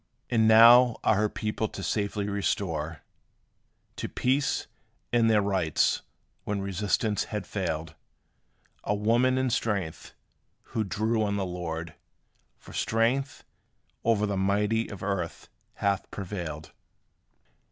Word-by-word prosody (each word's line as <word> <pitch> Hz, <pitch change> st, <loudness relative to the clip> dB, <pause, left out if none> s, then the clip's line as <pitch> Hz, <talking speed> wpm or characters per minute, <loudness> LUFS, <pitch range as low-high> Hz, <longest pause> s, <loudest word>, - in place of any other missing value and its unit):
And 110 Hz, -2 st, +4 dB
now 115 Hz, +2 st, +8 dB
are -, -, +4 dB
her 105 Hz, +1 st, +1 dB
people 110 Hz, +1 st, -2 dB
to 100 Hz, -, -8 dB
safety 100 Hz, 0 st, -1 dB
restored 85 Hz, -7 st, -2 dB, 1.0 s
To -, -, -4 dB
peace, 135 Hz, +3 st, 0 dB, 0.5 s
and 115 Hz, -1 st, +4 dB
their 105 Hz, -2 st, +4 dB
rights, 95 Hz, -6 st, +1 dB, 0.4 s
when 105 Hz, -1 st, -2 dB
resistance 100 Hz, +2 st, 0 dB
had 105 Hz, -2 st, -4 dB
failed: 80 Hz, -5 st, -3 dB, 0.9 s
A 105 Hz, -, 0 dB
woman 120 Hz, +5 st, +2 dB
in 130 Hz, 0 st, +1 dB
weakness, 100 Hz, -8 st, -3 dB, 0.5 s
who 110 Hz, -, -2 dB
drew 110 Hz, +3 st, 0 dB
on 100 Hz, -1 st, 0 dB
the 95 Hz, -, -1 dB
Lord 85 Hz, -2 st, -5 dB, 0.6 s
For -, -, -14 dB
strength, 125 Hz, +5 st, 0 dB, 0.6 s
o'er 110 Hz, -2 st, +2 dB
the 100 Hz, -1 st, -1 dB
mighty 105 Hz, +4 st, +1 dB
of 100 Hz, -3 st, -8 dB
earth 95 Hz, -4 st, -3 dB, 0.3 s
hath 100 Hz, -1 st, -1 dB
prevailed. 85 Hz, -6 st, -6 dB
105 Hz, 120 wpm, -27 LUFS, 95-115 Hz, 1.0 s, now